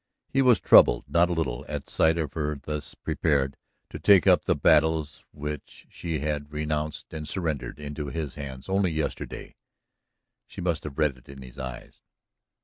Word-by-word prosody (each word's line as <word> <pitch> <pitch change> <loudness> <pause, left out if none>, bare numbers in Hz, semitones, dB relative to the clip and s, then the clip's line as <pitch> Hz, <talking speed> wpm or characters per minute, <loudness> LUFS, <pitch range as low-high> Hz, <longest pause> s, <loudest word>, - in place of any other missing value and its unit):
He 135 - +2
was 125 -4 +5
troubled - - +6
not 85 +1 +3
a - - 0
little 80 -8 -2
at - - -4
sight 80 +1 +2
of 75 -5 -2
her 75 -1 -2
thus 75 +1 -5
prepared 70 -4 0 0.4
to - - -6
take 100 -5 +6
up - - +5
the - - +2
battles 80 -1 +2
which 75 0 -7
she 80 -5 -4
had 75 -1 -3
renounced 75 0 -3
and 75 -1 -5
surrendered 75 -7 -3
into 75 0 -5
his 75 -2 -4
hands 65 -3 -8
only 95 -1 +2
yesterday. 80 -2 -4 0.9
She - - -11
must 85 -4 -1
have 70 -2 -7
read 75 -4 +1
it 60 - -24
in 70 -1 -10
his 65 -1 -12
eyes. 65 -1 -8
75 Hz, 170 wpm, -26 LUFS, 70-80 Hz, 0.9 s, troubled